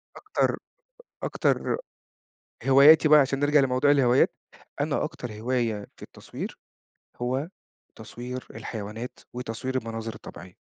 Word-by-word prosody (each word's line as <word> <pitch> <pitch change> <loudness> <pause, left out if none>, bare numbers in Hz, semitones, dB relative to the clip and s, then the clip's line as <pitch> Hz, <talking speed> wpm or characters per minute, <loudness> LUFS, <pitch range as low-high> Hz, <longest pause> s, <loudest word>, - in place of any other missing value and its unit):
أكتر، 420 - 0 0.7
أكتر - - 0 0.9
هواياتي 145 +4 +8
بقى 150 0 +8
عشان 135 0 +1
نرجع 145 +1 +4
لموضوع 135 +2 +3
الهوايات، 130 -3 +4 0.5
أنا 145 -1 0
أكتر 150 -7 -5
هواية 115 -2 -2
في - - -12
التصوير، - - -8 0.6
هو 130 +6 -2 0.5
تصوير 125 +1 -7
الحيوانات، 110 +2 -6
وتصوير 125 +1 -4
المناظر 115 -1 -5
الطبيعية. 90 -3 -11
125 Hz, 105 wpm, -26 LUFS, 115-140 Hz, 0.9 s, هواياتي